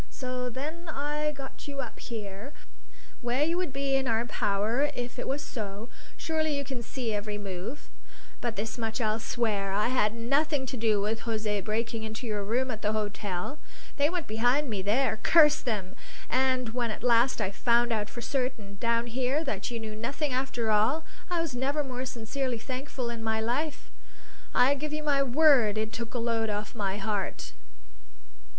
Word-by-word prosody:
So 250 Hz, -1 st, -3 dB
then 310 Hz, +7 st, -5 dB
I 300 Hz, +1 st, -1 dB
got 275 Hz, -1 st, -9 dB
you 280 Hz, -1 st, -5 dB
up 250 Hz, -4 st, -5 dB
here, 215 Hz, +3 st, -6 dB, 0.7 s
where 245 Hz, +3 st, +1 dB
you 330 Hz, +3 st, +2 dB
would 360 Hz, -5 st, -1 dB
be 275 Hz, +1 st, -1 dB
in 270 Hz, -1 st, +1 dB
our 230 Hz, 0 st, +2 dB
power 225 Hz, +5 st, +1 dB
if 245 Hz, 0 st, -4 dB
it -, -, -3 dB
was 280 Hz, +2 st, -1 dB
so; 210 Hz, -2 st, -5 dB, 0.3 s
surely 315 Hz, -2 st, 0 dB
you 280 Hz, -, -1 dB
can 265 Hz, -3 st, -4 dB
see 235 Hz, -1 st, -3 dB
every 205 Hz, 0 st, -2 dB
move? 200 Hz, +6 st, -5 dB, 0.5 s
But 235 Hz, -2 st, -1 dB
this 220 Hz, +4 st, -3 dB
much 225 Hz, 0 st, -1 dB
I'll 220 Hz, -1 st, +1 dB
swear 215 Hz, -4 st, 0 dB
I 210 Hz, +4 st, +2 dB
had 230 Hz, -4 st, +2 dB
nothing 275 Hz, +4 st, +1 dB
to 260 Hz, -, -4 dB
do 220 Hz, -3 st, +3 dB
with 215 Hz, +2 st, 0 dB
José 215 Hz, -3 st, -1 dB
breaking 225 Hz, +1 st, -1 dB
into 220 Hz, +3 st, -5 dB
your 210 Hz, -3 st, -1 dB
room 250 Hz, +5 st, +1 dB
at 220 Hz, -1 st, -5 dB
the 210 Hz, +1 st, +1 dB
hotel; 205 Hz, +3 st, -2 dB, 0.4 s
they 290 Hz, +1 st, +4 dB
went 350 Hz, -2 st, -2 dB
behind 245 Hz, +5 st, +2 dB
me 200 Hz, -3 st, -1 dB
there, 220 Hz, +3 st, +2 dB
curse 305 Hz, -3 st, +6 dB
them! 200 Hz, -6 st, -2 dB, 0.4 s
And 255 Hz, -1 st, +2 dB
when 240 Hz, 0 st, -1 dB
at 215 Hz, -, -5 dB
last 240 Hz, +1 st, +4 dB
I 190 Hz, -, 0 dB
found 235 Hz, +2 st, +3 dB
out 210 Hz, -1 st, -1 dB
for 240 Hz, -, -7 dB
certain, 235 Hz, -6 st, -2 dB
down 230 Hz, 0 st, +2 dB
here, 255 Hz, +5 st, 0 dB
that 280 Hz, -3 st, -2 dB
you 235 Hz, -1 st, -3 dB
knew 220 Hz, -1 st, -5 dB
nothing 270 Hz, +6 st, -2 dB
after 245 Hz, -4 st, 0 dB
all, 230 Hz, +10 st, +3 dB, 0.2 s
I 350 Hz, -1 st, +1 dB
was 325 Hz, -5 st, -2 dB
never 275 Hz, +4 st, 0 dB
more 255 Hz, -1 st, -4 dB
sincerely 245 Hz, +2 st, -2 dB
thankful 255 Hz, 0 st, -4 dB
in 230 Hz, -1 st, -5 dB
my 220 Hz, 0 st, +1 dB
life. 280 Hz, +7 st, -1 dB, 0.6 s
I 255 Hz, +3 st, +6 dB
give 300 Hz, +2 st, -3 dB
you 305 Hz, 0 st, -2 dB
my 285 Hz, -2 st, +3 dB
word 265 Hz, -5 st, +5 dB
it 220 Hz, +1 st, -1 dB
took 235 Hz, +1 st, -4 dB
a -, -, +2 dB
load 230 Hz, -1 st, +1 dB
off 210 Hz, 0 st, -3 dB
my 200 Hz, -3 st, -1 dB
heart." 205 Hz, -1 st, -2 dB
240 Hz, 185 wpm, -29 LUFS, 220-275 Hz, 0.7 s, curse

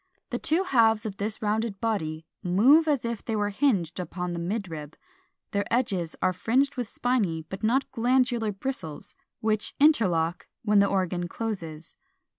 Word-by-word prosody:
The 245 Hz, -, -2 dB
two 325 Hz, +5 st, +3 dB
halves 225 Hz, -, +3 dB
of 200 Hz, -2 st, -5 dB
this 215 Hz, +2 st, -2 dB
rounded 215 Hz, -1 st, -1 dB
body 160 Hz, -8 st, -2 dB, 0.2 s
move 255 Hz, -, +5 dB
as 285 Hz, -6 st, +1 dB
if 235 Hz, -2 st, -3 dB
they 225 Hz, -, -2 dB
were 205 Hz, -1 st, 0 dB
hinged 200 Hz, -, +1 dB
upon 180 Hz, 0 st, -4 dB
the 170 Hz, -, -3 dB
midrib; 170 Hz, -5 st, -4 dB, 0.6 s
their 200 Hz, 0 st, -2 dB
edges 195 Hz, -9 st, 0 dB
are 185 Hz, -, +3 dB
fringed 260 Hz, +9 st, +1 dB
with 245 Hz, -4 st, -3 dB
spiny 205 Hz, -11 st, 0 dB
but 190 Hz, +1 st, -6 dB
not 245 Hz, +5 st, +1 dB
glandular 240 Hz, -2 st, +1 dB
bristles, 195 Hz, -, -5 dB, 0.3 s
which 215 Hz, -1 st, 0 dB
interlock 180 Hz, -, +3 dB, 0.2 s
when 210 Hz, -2 st, +4 dB
the 200 Hz, -, +5 dB
organ 180 Hz, -2 st, -1 dB
closes. 170 Hz, -7 st, -5 dB
210 Hz, 155 wpm, -27 LUFS, 180-240 Hz, 0.6 s, move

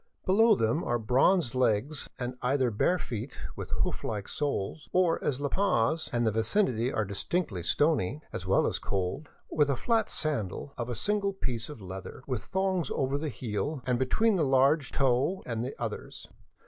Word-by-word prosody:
Below 220 Hz, +4 st, +5 dB
them 115 Hz, -, +1 dB
are 120 Hz, -, +1 dB
bronzed 125 Hz, -, +3 dB
legs 130 Hz, +3 st, 0 dB
and 125 Hz, 0 st, -4 dB
either 130 Hz, -1 st, +2 dB
bare 175 Hz, -, +2 dB
feet 120 Hz, -4 st, -5 dB, 0.2 s
with -, -, -6 dB
hoof -, -, -1 dB
like 105 Hz, -3 st, -3 dB
soles, 145 Hz, -1 st, -3 dB
or, 180 Hz, -2 st, +2 dB
as 140 Hz, -2 st, 0 dB
La 145 Hz, -, 0 dB
Paz 160 Hz, -, +1 dB
and 120 Hz, -3 st, +1 dB
vicinity 115 Hz, -, +1 dB
are 110 Hz, -, 0 dB
distinctly 100 Hz, -, -2 dB
stony, 140 Hz, -, +1 dB
as 95 Hz, -, -5 dB
well 95 Hz, -, +4 dB
as -, -, -1 dB
cold, 100 Hz, +11 st, -2 dB, 0.2 s
with 150 Hz, -2 st, +3 dB
a 140 Hz, -, +2 dB
flat 225 Hz, -, +1 dB
sandal 140 Hz, -, -2 dB
of 120 Hz, 0 st, -4 dB
a 120 Hz, -, -2 dB
single 205 Hz, -, 0 dB
piece 120 Hz, -, -3 dB
of 145 Hz, -8 st, -9 dB
leather, 95 Hz, +6 st, -8 dB
with 125 Hz, -4 st, -3 dB
thongs 190 Hz, -4 st, 0 dB
over 135 Hz, +1 st, 0 dB
the 155 Hz, 0 st, -2 dB
heel 125 Hz, +4 st, -3 dB
and 125 Hz, -2 st, +1 dB
between 210 Hz, -, +2 dB
the 165 Hz, -, +2 dB
large 135 Hz, +1 st, +3 dB
toe 135 Hz, +8 st, +1 dB
and 115 Hz, -2 st, -2 dB
the 130 Hz, -, -4 dB
others. 115 Hz, -3 st, -5 dB
130 Hz, 175 wpm, -29 LUFS, 115-160 Hz, 0.2 s, Below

